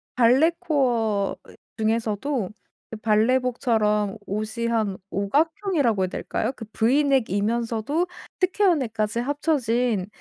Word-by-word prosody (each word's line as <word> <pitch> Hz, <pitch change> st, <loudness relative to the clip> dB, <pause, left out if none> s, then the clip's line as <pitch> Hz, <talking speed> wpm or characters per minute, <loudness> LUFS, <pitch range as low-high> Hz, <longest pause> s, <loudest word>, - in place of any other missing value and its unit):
발레 255 Hz, +7 st, +5 dB
코어 230 Hz, -9 st, +1 dB
이 -, -, -15 dB, 0.2 s
중에서도 225 Hz, +1 st, -1 dB, 0.4 s
그 225 Hz, -, -5 dB
발레복처럼 220 Hz, -2 st, +1 dB
옷이 215 Hz, +4 st, -3 dB
한 220 Hz, -4 st, 0 dB
5 200 Hz, +1 st, -2 dB
각형이라고 305 Hz, -, +1 dB
해야 -, -, +1 dB
될까요? 240 Hz, -, -2 dB
그 225 Hz, -, -8 dB
브이넥이면서도 235 Hz, -, +1 dB, 0.3 s
스퀘어넥까지 265 Hz, -, +1 dB
합쳐진 245 Hz, -, 0 dB
230 Hz, 265 characters per minute, -24 LUFS, 215-275 Hz, 0.4 s, 발레